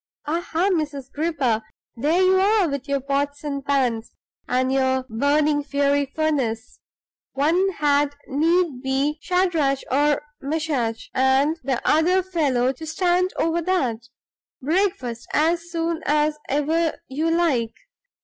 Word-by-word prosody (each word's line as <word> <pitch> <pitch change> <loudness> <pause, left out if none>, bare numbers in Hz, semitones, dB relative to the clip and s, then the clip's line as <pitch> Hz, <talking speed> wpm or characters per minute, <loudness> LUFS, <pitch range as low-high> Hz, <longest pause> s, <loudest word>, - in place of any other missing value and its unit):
"Aha, 340 +4 0
Mrs. 290 -5 -3
Gripper, 285 -8 0 0.3
there 310 +9 +2
you 375 0 +4
are 400 -1 +3
with 280 -2 -4
your 280 -1 0
pots 280 +2 -2
and 280 -2 -4
pans, 255 -5 -1 0.3
and 255 +1 +1
your 260 -1 +1
burning 290 +5 +1
fiery 280 0 +1
furnace! 265 -7 -2 0.5
One 335 +8 +2
had 290 -2 +1
need 320 -1 +1
be 275 +3 -1
Shadrach, 335 -7 +1 0.6
Meshach, 275 -6 -2
and 270 +5 +2
the 260 -2 -2
other 360 +4 +3
fellow 280 -9 +1
to 320 +5 -9
stand 360 +3 +1
over 330 +1 +1
that. 255 -10 -1 0.5
Breakfast 305 - -1
as 335 +2 +1
soon 335 0 -2
as 300 +1 +2
ever 315 +4 0
you 300 +5 -1
like. 310 -10 +1
295 Hz, 120 wpm, -23 LUFS, 265-330 Hz, 0.6 s, you